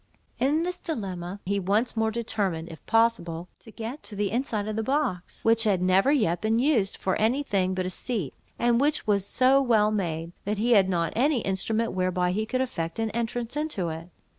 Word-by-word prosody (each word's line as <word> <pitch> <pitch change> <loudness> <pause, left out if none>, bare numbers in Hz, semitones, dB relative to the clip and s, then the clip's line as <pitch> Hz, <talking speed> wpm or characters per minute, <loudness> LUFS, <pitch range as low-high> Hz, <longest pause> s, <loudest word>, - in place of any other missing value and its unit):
In 290 +6 +2
this 360 +1 -3
dilemma, 195 - -5
he 200 +2 0
once 205 +7 0
more 220 0 +1
determined, 200 -7 -2
if 160 - -11
possible, 185 -7 +1
to - - -15
get 230 +6 -6
to 210 - -10
the 200 -1 -1
inside 225 -4 -1
of 215 - -3
the 220 - 0
box, 255 - -2
which 225 0 +4
had 205 -5 +2
never 185 +8 +3
yet 175 - +1
been 220 +1 +1
used 240 -7 +2
for 190 - 0
any 240 +7 +1
thing 190 -6 0
but 185 -1 -1
a 185 - -2
seat, 200 - -3 0.2
and 240 +1 +2
which 295 +2 +1
was 200 -3 +1
so 265 +4 +4
well 220 -5 +3
made, 170 -5 -2
that 210 +1 -2
he 235 +4 +1
had 195 -5 +5
not 170 -3 0
any 265 +1 +2
instrument 215 +4 -1
whereby 185 -1 0
he 215 +4 -1
could 255 +3 0
effect 165 -10 -3
an 225 -1 -1
entrance 235 +2 -3
into 295 - -2
it. 165 +2 -7
215 Hz, 205 wpm, -26 LUFS, 185-240 Hz, 0.2 s, had